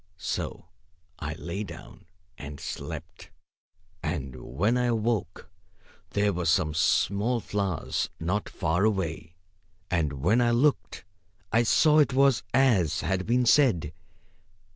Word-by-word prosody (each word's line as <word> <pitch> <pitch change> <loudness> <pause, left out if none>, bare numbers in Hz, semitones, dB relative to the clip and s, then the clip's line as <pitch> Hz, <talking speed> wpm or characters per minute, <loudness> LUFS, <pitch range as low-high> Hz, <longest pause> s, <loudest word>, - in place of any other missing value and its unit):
So 80 - -4 0.5
I 75 -1 -4
lay 85 +5 -5
down 100 - -11 0.3
and 75 -4 -9
slept. - - -7 0.7
And 75 -6 -4 0.2
when 105 +7 +2
I 125 0 +1
awoke 110 -5 -2 0.6
there 100 0 +1
were 90 0 -2
some 75 -2 +2
small 100 +8 +1
flowers 100 -6 -2
not 95 +6 -2
far 85 +2 0
away; 85 -6 -1 0.6
and 80 -5 +1
when 90 - +2
I 120 - +3
looked 125 - +1 0.5
I 115 - +4
saw 150 +6 +4
it 145 -3 +3
was 135 -2 +4
as 105 - +3
had 95 0 -1
been 125 +2 +2
said. 115 - +3
100 Hz, 120 wpm, -27 LUFS, 80-120 Hz, 0.7 s, I